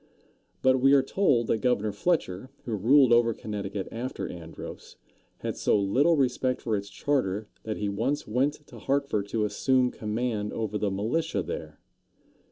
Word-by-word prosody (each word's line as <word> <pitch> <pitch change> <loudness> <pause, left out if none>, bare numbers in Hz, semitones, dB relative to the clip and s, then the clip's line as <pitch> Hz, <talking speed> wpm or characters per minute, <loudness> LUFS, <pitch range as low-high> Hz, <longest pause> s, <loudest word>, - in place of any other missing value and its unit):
But 130 0 +4
we 135 +1 +6
are 135 -2 +6
told 135 -7 +2
that 110 - +1
Governor 110 -3 +1
Fletcher, 115 - -1 0.2
who 115 - -3
ruled 125 +5 +5
over 120 -1 +4
Connecticut 100 -2 -4
after 120 +3 -4
Andros, 80 -2 -9 0.5
had - - -3
so - - +2
little 135 +12 +3
respect 130 -1 +1
for 110 -3 -1
its 100 0 -4
charter 105 -6 -1 0.2
that 110 -1 -3
he 105 - -2
once 115 +9 -1
went 140 +6 0
to - - -12
Hartford 140 -8 0
to 105 0 0
assume 125 +4 +2
command 110 -1 -2
over 110 -2 -2
the 105 - 0
militia 115 +13 -1
there. 75 -1 -6
115 Hz, 160 wpm, -27 LUFS, 105-130 Hz, 0.5 s, we